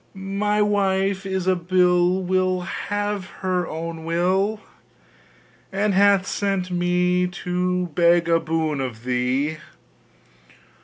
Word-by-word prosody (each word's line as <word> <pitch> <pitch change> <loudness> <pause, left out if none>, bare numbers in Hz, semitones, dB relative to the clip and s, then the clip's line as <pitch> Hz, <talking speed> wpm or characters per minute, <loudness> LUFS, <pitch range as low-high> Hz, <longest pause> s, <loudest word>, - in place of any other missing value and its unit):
My 200 +2 0
wife 195 -1 0
Ilsabill 180 -1 +2
Will 185 0 +1
have 205 +1 -3 0.2
her 180 -2 0
own 165 0 -6
will, 185 +6 0 1.1
And 200 +1 0
hath 200 0 +4
sent 195 -3 -2
me 180 0 +1
to 180 0 -2
beg 170 +1 +3
a 165 0 +3
boon 160 -3 -1
of 120 -3 -5
thee! 130 +5 0
180 Hz, 100 wpm, -22 LUFS, 170-195 Hz, 1.1 s, hath